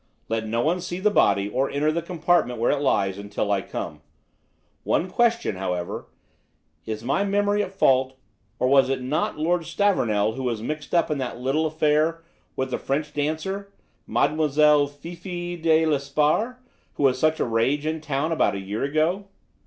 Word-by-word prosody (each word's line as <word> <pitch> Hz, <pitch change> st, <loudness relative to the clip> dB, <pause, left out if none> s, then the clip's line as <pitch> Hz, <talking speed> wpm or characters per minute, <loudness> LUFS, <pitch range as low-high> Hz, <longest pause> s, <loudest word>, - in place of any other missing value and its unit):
Let 110 Hz, 0 st, -1 dB
no 115 Hz, +2 st, 0 dB
one 175 Hz, +7 st, +1 dB
see 175 Hz, +1 st, -5 dB
the 210 Hz, +2 st, +2 dB
body 100 Hz, -, +3 dB
or 130 Hz, +6 st, 0 dB
enter 150 Hz, +2 st, +1 dB
the 170 Hz, +2 st, -1 dB
compartment 170 Hz, -8 st, +1 dB
where 115 Hz, -, +2 dB
it 145 Hz, -, 0 dB
lies 100 Hz, -8 st, +1 dB
until 100 Hz, 0 st, -3 dB
I 100 Hz, -1 st, +2 dB
come. -, -, -6 dB, 0.8 s
One 180 Hz, -, +1 dB
question, 230 Hz, -, +1 dB
however: 90 Hz, -2 st, -3 dB, 0.8 s
is 110 Hz, 0 st, -4 dB
my 140 Hz, +11 st, +1 dB
memory 205 Hz, +1 st, +1 dB
at 190 Hz, -, -3 dB
fault, 130 Hz, -7 st, +2 dB, 0.4 s
or 125 Hz, -, +1 dB
was 135 Hz, 0 st, +5 dB
it 135 Hz, -1 st, -1 dB
not 140 Hz, +5 st, -1 dB
Lord 170 Hz, +3 st, +1 dB
Stavornell 110 Hz, -, +1 dB
who 135 Hz, -, -6 dB
was 120 Hz, -4 st, -1 dB
mixed 150 Hz, +8 st, -4 dB
up 165 Hz, -2 st, +2 dB
in 150 Hz, -, -1 dB
that 125 Hz, -2 st, -4 dB
little 140 Hz, +5 st, +1 dB
affair 155 Hz, +1 st, +1 dB, 0.3 s
with 130 Hz, 0 st, -2 dB
the -, -, -1 dB
French 150 Hz, +2 st, -2 dB
dancer, 160 Hz, +7 st, -3 dB, 0.4 s
Mademoiselle 150 Hz, -1 st, +3 dB
Fifi 175 Hz, +4 st, -7 dB
de 160 Hz, -1 st, +3 dB
Lesparre, 150 Hz, -, +1 dB, 0.4 s
who -, -, -2 dB
was 130 Hz, -2 st, +3 dB
such 155 Hz, 0 st, +2 dB
a -, -, +1 dB
rage 130 Hz, +6 st, +1 dB
in 160 Hz, 0 st, -2 dB
town 150 Hz, +1 st, -1 dB
about 160 Hz, -, +2 dB
a -, -, -3 dB
year 100 Hz, +3 st, -4 dB
ago?" 160 Hz, +8 st, 0 dB
150 Hz, 175 wpm, -24 LUFS, 130-170 Hz, 0.8 s, was